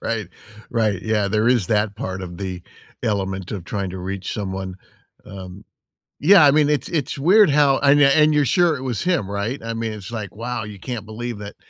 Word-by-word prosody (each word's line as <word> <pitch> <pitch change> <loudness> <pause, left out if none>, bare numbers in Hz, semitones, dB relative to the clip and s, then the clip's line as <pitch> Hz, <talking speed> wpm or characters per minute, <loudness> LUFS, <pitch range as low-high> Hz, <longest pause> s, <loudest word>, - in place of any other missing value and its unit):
Right. 110 -6 -3 0.4
Right, 110 -5 0
yeah. 105 -2 0
There 110 +3 +1
is 120 -7 +2
that 105 0 0
part 95 -2 -5
of 90 -1 -8
the 90 -2 -5 0.4
element 95 -3 -2
of 95 -5 -5
trying 95 +1 -3
to 95 - -7
reach 95 +1 -5
someone, 95 -2 -4 0.5
um 95 +1 -10 0.6
yeah, 180 +1 +7
I 140 - +7
mean, 150 0 +3
it's 150 -1 0
it's 150 -4 -2
weird 190 +5 +5
how 140 -2 +4
and 145 +1 +4
and 150 +2 +5
you're 150 -1 +3
sure 170 +5 +3
it 130 - -7
was 125 -5 -2
him, 175 - 0
right? 100 +6 -3
I 115 0 -4
mean, 115 -1 -3
it's 105 +1 -9
like, 105 -5 -6
wow, 120 +1 -4
you 105 -1 -9
can't 115 0 -6
believe 110 0 -6
it, 100 0 -8
110 Hz, 205 wpm, -21 LUFS, 95-140 Hz, 0.6 s, yeah